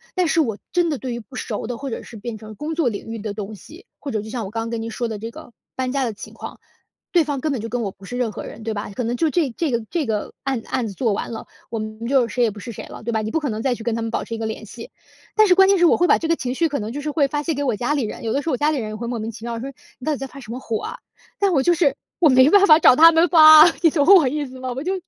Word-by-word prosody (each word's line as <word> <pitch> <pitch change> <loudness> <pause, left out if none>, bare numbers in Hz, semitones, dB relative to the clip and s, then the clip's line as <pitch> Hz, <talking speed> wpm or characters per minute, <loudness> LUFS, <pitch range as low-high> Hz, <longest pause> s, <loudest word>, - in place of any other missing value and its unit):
但 365 -2 +2
是 325 - +3
我 225 -8 -2
真 350 -2 +2
的 295 - -1
对 255 -1 -5
于 235 - -4
不 255 +4 -14
熟 220 -4 -4
的， 245 -1 -4
或 275 0 -5
者 - - -4
是 230 - -11
变 225 +2 -6
成 215 -1 -11
工 300 +7 -4
作 315 -6 +1
领 205 - -6
域 225 0 -5
的 205 -1 -5
东 210 0 -6
西， 320 - -14
或 285 - -6
者 215 - -1
就 220 - -9
像 235 -5 -3
我 - - -6
刚 225 - -3
刚 230 - -4
跟 230 -1 -3
您 230 - -5
说 235 +1 -3
的 215 -2 -5
这 225 - -5
个 230 - -13 0.2
搬 255 -1 -2
家 275 0 0
的 235 - -2
情 215 - -11
况， - - -9 0.5
对 345 -2 +4
方 285 -2 -3
根 310 0 -1
本 260 - -2
就 230 - -5
跟 245 +1 -2
我 195 - -3
不 195 - -21
是 245 +5 -6
任 245 -3 -1
何 - - -7
人， 220 - -10
对 225 - -2
吧？ 205 0 -5
可 250 - -2
能 235 +2 -1
就 320 +5 +2
这 310 -2 +1
这 325 -4 -1
个 235 -1 -1
这 335 -4 -1
个 210 -2 -3
案 265 -3 -1
子 - - -19
案 235 -3 -1
子 200 - -7
做 225 0 0
完 210 - -4
了， 225 - -7 0.2
我 230 - -4
们 215 +2 -6
就 260 -3 +3
谁 245 +1 0
也 230 - +3
不 205 - -11
是 235 - -7
谁 - - -8
了， - - -11
对 235 - -2
吧？ 220 -1 0
你 215 - -3
不 320 - +1
可 295 - -3
能 215 -1 -3
再 250 0 0
去 225 - -10
跟 235 - -1
他 230 - -3
们 225 - -3
保 - - -2
持 230 - -7
一 - - -6
个 225 - -4
联 220 0 -5
系。 230 +2 -10 0.5
但 435 -1 +5
是 365 - +6
关 385 +1 +6
键 395 - +4
是， 350 - +4
我 - - +5
会 355 - +3
把 - - +5
这 325 - -3
个 330 - +2
情 255 -4 -4
绪， 330 +4 +2
可 285 - -2
能 215 0 -5
就 280 - -5
是 300 - -3
会 285 -2 +2
发 295 +1 -3
泄 325 - -1
给 285 0 -2
我 245 -6 0
家 245 +7 -1
里 285 -3 0
人， 215 - -6
有 225 -1 -1
的 280 - 0
时 325 - -4
候 - - 0
我 250 - 0
家 300 +1 +2
里 295 - -1
人， 220 -3 -3
也 215 - -6
会 235 +2 -5
莫 235 -2 -3
名 220 - -4
其 225 +1 -10
妙 230 -1 -4
说： 270 +3 -6 0.3
“你 255 - -10
到 310 - +1
底 - - -3
在 270 - -5
发 275 +2 -12
什 235 -3 -10
么 250 - -5
火 225 -4 -3
啊？” - - -6 0.4
但 395 -2 +2
我 275 - +3
就 350 - +4
是 325 -4 +2 0.2
我 320 - +5
没 260 +1 +6
办 400 +3 +6
法 310 0 +8
找 255 - +7
他 330 +3 +8
们 330 +2 +4
发 310 -2 +9
啊， 345 - +1
你 330 - +7
懂 290 -2 +1
我 315 -8 +5
意 295 +2 -2
思 260 0 -11
吗？ 255 -1 -4
我 265 +4 -5
就 370 - -1
250 Hz, 390 characters per minute, -21 LUFS, 225-300 Hz, 0.5 s, 发